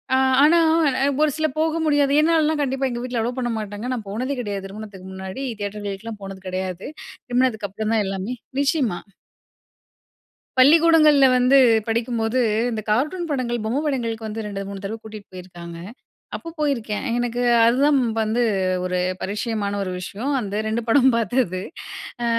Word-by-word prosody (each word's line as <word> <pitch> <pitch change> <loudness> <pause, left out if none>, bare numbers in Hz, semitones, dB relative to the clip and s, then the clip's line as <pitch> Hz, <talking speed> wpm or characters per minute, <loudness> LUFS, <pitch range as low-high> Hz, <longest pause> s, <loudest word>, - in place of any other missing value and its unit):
ஆ - - +4 0.3
ஆனா 330 +3 +6 0.6
ஒரு 305 -1 +4
சில 315 - +1
போக 320 0 +1
முடியாது, 290 -2 +3
என்னாலலாம் 315 -1 +2
கண்டிப்பா 270 -1 0
எங்க 240 0 -4
வீட்ல 250 -2 -2
அலோ 240 +2 -1
பண்ண 245 -1 -1
மாட்டாங்க. 210 +2 -5
நான் 225 -4 -5
போனதே 255 +7 -2
கிடையாது 200 -4 -4
திருமணத்துக்கு 200 -1 -9
முன்னாடி, 190 +8 -6 0.2
தியேட்டர்களுக்கெலாம் 205 +1 -5
போனது 195 -1 -8
கிடையாது. 185 0 -4 0.4
திருமணத்துக்கு 245 -4 0
அப்புறம் 215 +3 -3
தான் 215 - +2
எல்லாமே 195 +4 -3 0.3
நிச்சயமா. 275 - +1 1.6
பள்ளிக்கூடங்கள்ல 305 0 +6
வந்து 255 +2 +5 0.3
படிக்கும்போது 230 +1 0 0.3
இந்த 215 -1 -3
கார்ட்டூன் 305 +10 0
படங்கள், 240 -4 -2
பொம்மை 245 +6 0
படங்களுக்கு 230 -5 -2
வந்து 220 +1 -5
2, 195 -1 -5
3 200 0 -8
தடவ 220 +3 -4
கூட்டிட்டு 215 -2 -10
போயிருக்காங்க. 175 -2 -9 0.6
அப்போ 335 - -10
போயிருக்கேன். 255 -7 -1
எனக்கு 245 0 -2 0.2
அது 235 +2 +4
தான் 295 -1 +4 0.2
வந்து 220 +3 +1 0.4
ஒரு 180 0 -1 0.2
பரிட்சயமான 205 0 -2
ஒரு 185 - -3
விஷயம். 220 +10 -4
அந்த 205 -1 -3
2 220 +2 -1
படம் 265 +2 +5
பார்த்தது. 225 -4 0 0.6
அ - - 0
230 Hz, 145 wpm, -22 LUFS, 205-265 Hz, 1.6 s, ஆனா